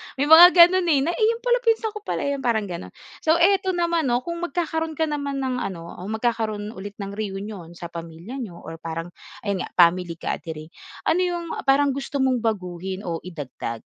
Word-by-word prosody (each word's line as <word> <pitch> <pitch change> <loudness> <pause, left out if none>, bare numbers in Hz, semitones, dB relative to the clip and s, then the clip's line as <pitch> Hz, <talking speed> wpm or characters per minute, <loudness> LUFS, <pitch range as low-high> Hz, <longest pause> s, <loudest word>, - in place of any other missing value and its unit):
May 275 - 0
mga 350 +3 +10
gano'n, 355 +1 +7
eh, 290 -4 +4
na, 335 - 0
"Iyon 455 +4 +1
pala, - - +3
pinsan 455 -2 +1
ko 425 - -7
pala - - -3
'yon." 280 0 -1
parang 235 -4 +1
gano'n. 170 - -7 0.2
So, 320 0 +3
eto 375 +2 +3
naman 340 -3 +1
'no, 245 0 +1
kung 340 +2 -5
magkakaroon 325 -1 -2
ka 320 - 0
naman 285 -3 -2
ng 255 -1 -1
ano 170 -5 -5
o 185 - -7
magkakaroon 220 -2 -2
ulit 205 -1 -8
ng 200 - -6
reunion 195 -4 -6
sa 170 0 -8
pamilya 170 +9 -8
niyo 210 -9 -6
or 165 -1 -10
parang 165 +1 -5 0.3
ayun 200 -3 -2
nga - - -20
family 175 0 +4
gathering, 160 -1 -5 0.3
ano 335 - +2
'yong, 350 -2 -1
ah, - - -6
parang 280 +1 +4
gusto 275 0 -2
mong 260 -2 +2
baguhin 190 -3 -3
o 165 -2 -3
idagdag? 140 -9 -6
240 Hz, 200 wpm, -23 LUFS, -, 0.3 s, mga